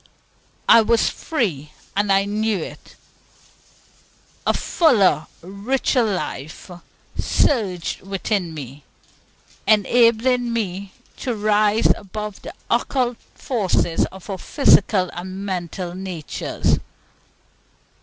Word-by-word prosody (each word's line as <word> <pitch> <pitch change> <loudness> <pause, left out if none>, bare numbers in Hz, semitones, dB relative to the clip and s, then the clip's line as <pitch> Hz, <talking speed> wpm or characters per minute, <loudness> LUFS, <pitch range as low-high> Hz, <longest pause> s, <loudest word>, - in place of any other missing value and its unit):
I 230 - +8
was 230 +1 +2
free, 175 - -2 0.2
and 205 0 +1
I 195 0 +4
knew 215 +1 0
it. 160 - -9 1.5
A - - +4
fuller, 210 - +3 0.2
richer 220 +8 0
life 180 - -4 0.5
surged 195 - 0
within 195 -2 -2
me, 140 -2 -9 0.8
enabling 235 +3 +3
me 200 -4 -3 0.2
to 245 -3 -2
rise 210 +1 +3
above 210 +1 -7
the - - -9
occult 245 0 0 0.2
forces 190 -8 0
of 190 -1 -12
our 195 -3 -4
physical 200 -9 +3
and 185 +3 -6
mental 180 -1 -4
natures. 180 -4 -2
200 Hz, 95 wpm, -21 LUFS, 185-230 Hz, 1.5 s, I